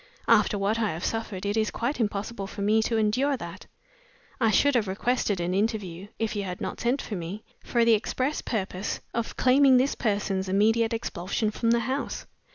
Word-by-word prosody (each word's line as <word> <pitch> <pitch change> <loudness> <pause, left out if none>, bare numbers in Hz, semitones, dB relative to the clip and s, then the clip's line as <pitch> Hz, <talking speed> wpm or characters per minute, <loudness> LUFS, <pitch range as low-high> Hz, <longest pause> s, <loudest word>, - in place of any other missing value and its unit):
After 210 -2 +4
what 205 +3 0
I 215 -6 0
have 165 +3 -4
suffered 210 -4 -3
it 205 +1 0
is 220 -1 +1
quite 245 +4 -2
impossible 205 -1 -2
for 200 0 -5
me 215 +2 +4
to 225 +1 0
endure 255 +6 +2
that. 170 -3 -9 0.7
I 225 -3 +3
should 285 +7 +4
have 230 -5 +2
requested 205 0 0
an 175 +1 -1
interview 200 -3 -2
(if 225 -1 -2
you 205 - -1
had 180 -2 -5
not - - -4
sent 245 +4 +1
for - - -6
me) 180 +5 -6 0.2
for 235 -1 +2
the 230 - +6
express 255 +6 0
purpose 195 -3 -3
of 230 -1 -3
claiming 260 0 +5
this 265 +3 +2
person's 200 -4 -1
immediate 225 +4 +3
expulsion 215 -1 -2
from 230 +2 -1
the 235 0 +3
house. 260 +4 -3
215 Hz, 190 wpm, -27 LUFS, 195-235 Hz, 0.7 s, the